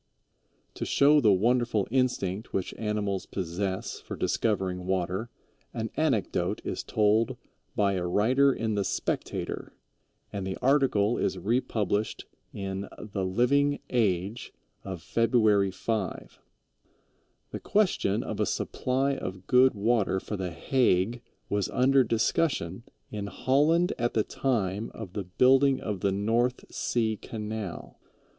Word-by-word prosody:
To - - -5
show 145 +1 +4
the 110 - +5
wonderful 115 +1 +2
instinct 115 -6 -1
which 95 - -2
animals 105 -3 -2
possess 95 +1 -3
for - - -7
discovering 95 -4 -1
water 95 +4 -1 0.5
an 110 0 -3
anecdote 135 -10 0
is - - -3
told 110 +1 +2 0.4
by 100 -2 +2
a 90 -2 -1
writer 125 +10 +3
in 110 -4 -2
the 100 -1 0
Spectator, - - -3 0.6
and 100 -2 -3
the 95 - -3
article 125 -5 +2
is - - 0
republished 105 0 -1 0.3
in 95 0 -5
the 100 -2 -4
Living 135 +9 +2
Age 105 -2 0 0.3
of 95 -4 -6
February 110 -4 +3
5. 95 +2 -4 1.1
The - - -5
question 185 - +1
of - - -5
a - - +1
supply 135 +2 0
of 95 -5 -6
good 125 0 +5
water 105 -2 +1
for 105 - -5
the 95 -2 -3
Hague 110 +4 +1 0.3
was 100 -1 -1
under 135 +1 +4
discussion 115 - 0 0.3
in 105 -1 -4
Holland 150 - +2
at 120 0 0
the 110 - +3
time 110 -5 -1
of 100 -5 -8 0.2
building 135 +1 +5 0.2
the 100 - +1
North 115 +5 0
Sea 110 -3 0
Canal. 105 -4 -6
110 Hz, 125 wpm, -28 LUFS, 95-125 Hz, 1.1 s, the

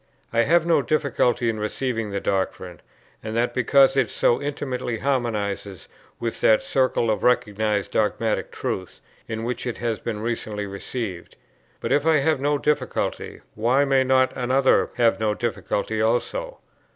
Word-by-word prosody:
I 115 0 +3
have 170 +3 +3
no 170 -4 +3
difficulty 130 -5 +1
in 110 -2 -1
receiving 115 +1 -2
the 100 0 -2
doctrine; 95 -3 -2 0.4
and 110 +1 -4
that, 120 +1 +1
because 135 +2 +4
it 130 -5 +2
so 120 - +1
intimately 135 -4 -3
harmonizes 105 -7 -2 0.3
with 115 -1 -4
that 110 - +4
circle 130 -4 +1
of 110 - -1
recognized 105 -4 +1
dogmatic 110 +1 0
truths, 95 -1 -5 0.3
into 110 0 -4
which 125 +2 -3
it 120 - -3
has 115 -2 -2
been 110 -3 -4
recently 110 -2 -3
received; 100 -1 -6 0.4
but - - -4
if 145 +2 +2
I 160 -1 +5
have 145 0 +1
no 145 +1 +2
difficulty, 150 +1 -2
why 125 +6 +2
may 135 -1 +3
not 130 0 +2
another 130 +1 +2
have 115 -2 +3
no 105 -1 0
difficulty 110 -2 -2
also? - - -1
120 Hz, 150 wpm, -23 LUFS, 110-135 Hz, 0.4 s, I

